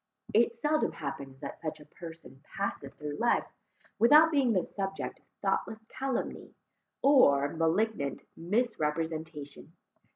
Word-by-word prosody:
It 230 +2 +5
seldom 295 +7 0
happens 135 -1 -6
that - - -7
such 155 -1 -4
a 150 - -13
person 160 -4 -12
passes 195 -8 -3
through 150 0 -5
life, 240 0 +2 0.5
without 300 +8 +7
being 275 -5 +3
the 185 -5 +2
subject 195 -1 -4
of - - -34 0.2
thoughtless 220 0 -1
calumny, 265 -1 -3 0.5
or 145 - +6
malignant 165 -1 0
misrepresentation. 160 - -2
170 Hz, 120 wpm, -30 LUFS, 150-235 Hz, 0.5 s, without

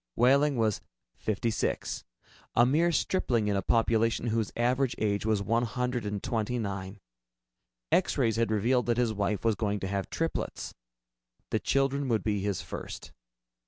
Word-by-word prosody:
Wehling 140 +3 +4
was 110 -4 +1 0.3
fifty 110 +2 -1
six, 110 - -2 0.5
a 120 - +6
mere 160 +7 +3
stripling 125 - +1
in 100 - +1
a 100 - +1
population 115 +3 +2
whose 115 -2 0
average 125 +1 +1
age 105 0 0
was 105 -2 +1
one 115 +4 +2
hundred 125 -1 -2
and 100 -1 -3
twenty 115 +1 -1
nine. 100 -2 -4 0.9
X - - +2
rays 110 -2 +2
had 115 -1 +2
revealed 120 +4 +2
that 120 -1 +2
his 120 -3 +2
wife 105 +1 -1
was 115 - +4
going 105 -1 -1
to 95 - -2
have 100 0 -2
triplets. 165 0 -3 0.8
The - - +2
children 135 0 +1
would 115 -3 +1
be 105 -2 0
his 100 -1 -2
first. - - -7
115 Hz, 160 wpm, -29 LUFS, 105-125 Hz, 0.9 s, a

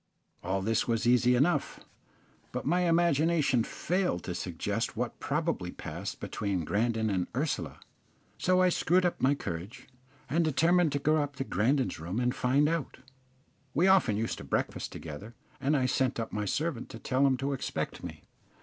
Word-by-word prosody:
All 95 0 -1
this 110 +2 +1
was 115 -1 0
easy 125 +1 +4
enough, 150 +8 +1 0.7
but - - -4
my 175 +3 +2
imagination 160 -6 +3
failed 180 - -1
to - - -4
suggest - - -3
what - - -3
probably - - -1
passed - - -6
between 95 -5 -2
Grandon 110 +3 0
and 90 -2 0
Ursula; 145 +4 -2 0.6
so 185 0 +3
I 185 - +5
screwed 180 +1 +2
up 175 - -1
my 140 +2 +4
courage 90 -3 -6 0.4
and 165 +3 +2
determined 165 +2 +3
to - - +1
go 155 +2 +2
up 145 -1 -4
to 135 - -2
Grandon's 130 - 0
room 90 +8 -3
and 125 0 +1
find 135 +4 +2
out 165 -3 -2 0.8
We 165 +6 +4
often 190 - +4
used 115 +1 -2
to - - -8
breakfast - - -2
together, 90 +10 -8 0.2
and 140 +3 +2
I 130 - +1
sent 130 -1 +1
up 115 - -3
my 105 -1 -1
servant 145 - -2
to - - -8
tell 130 +4 +2
him 130 -1 +2
to 135 +2 -1
expect 135 - -4
me. - - -8
135 Hz, 170 wpm, -30 LUFS, 115-160 Hz, 0.8 s, I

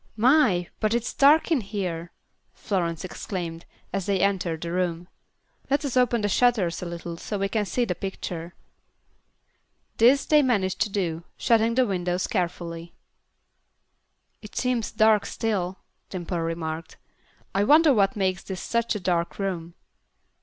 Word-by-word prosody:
"My, 220 - +4
but 215 +1 +1
it's 240 0 -2
dark 295 +4 +5
in 300 -6 +3
here!" 180 -5 -4 0.4
Florence 170 -4 -2
exclaimed, 170 -3 -5 0.3
as 195 -1 -2
they 200 -2 +1
entered 180 -5 0
the 170 - -4
room. 175 -1 -1 0.6
"Let 285 +2 +1
us 270 - -3
open 245 -2 +3
the 205 - +1
shutters 205 -5 +2
a 180 - -4
little 170 0 -6
so 205 +4 -4
we 195 0 0
can 210 +1 -1
see 240 +6 0
the - - -1
picture." 175 -3 -6 1.4
This 255 +5 +5
they 300 -1 +5
managed 205 -9 0
to 215 - +2
do, 170 -5 -2
shutting 230 0 +2
the 255 0 +4
window 180 -4 -1
carefully. 170 -3 -3 1.5
"It 215 - -12
seems 250 -3 0
dark 215 -1 +4
still," 190 -4 -2 0.3
Dimple 175 -1 -4
remarked. 165 -1 -4 0.6
"I 195 - +2
wonder 300 +5 +6
what 200 -4 +2
makes 190 -2 0
this 190 -2 -6
such 235 -1 -1
a - - -2
dark 175 -2 -1
room." 175 -4 -3
195 Hz, 145 wpm, -25 LUFS, 175-230 Hz, 1.5 s, wonder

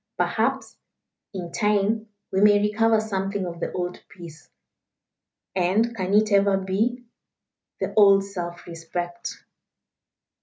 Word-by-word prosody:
Perhaps, - - -1 0.5
in 180 -4 -6
time, 210 +1 +1 0.2
we 190 - +1
may 205 0 +6
recover 220 +2 +2
something 195 -2 -2
of 170 -1 -6
the - - -3
old 180 0 -4
peace 160 -4 -13 1.1
and 200 +6 +1
can 190 -1 -1
it 215 0 +3
ever 200 -1 +4
be? 210 +6 -1 0.8
the - - -3
old 200 -2 +6
self 175 -3 -6
respect." 175 +1 -6
195 Hz, 115 wpm, -24 LUFS, 180-210 Hz, 1.1 s, may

